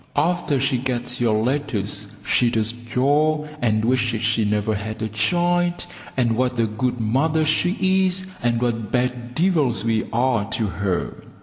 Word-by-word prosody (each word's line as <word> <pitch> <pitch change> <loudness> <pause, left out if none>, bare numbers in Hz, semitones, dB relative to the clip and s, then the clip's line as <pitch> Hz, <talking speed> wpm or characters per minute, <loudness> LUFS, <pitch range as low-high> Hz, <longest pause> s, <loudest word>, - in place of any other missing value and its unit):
After 155 -2 +1
she 130 -1 +1
gets 125 -1 -2
your 115 -3 +3
letters 115 -7 -2 0.2
she 120 - +3
does 110 -1 +1
jaw, 145 +6 +1 0.2
and 110 -2 +1
wishes 120 -2 +1
she 115 0 +2
never 105 +1 0
had 110 +1 -5
a - - 0
child, 175 - +1 0.3
and 120 -3 +2
what 125 0 0
a 115 - +3
good 120 +3 -2
mother 145 +8 +1
she 190 +4 +2
is, 185 +1 -2 0.2
and 120 -1 +1
what 115 -3 -2
bad 125 -1 -1
devils 155 - +2
we 110 -1 +1
are 120 -3 +1
to 110 - 0
her. 95 -2 -3
120 Hz, 160 wpm, -22 LUFS, 110-145 Hz, 0.3 s, your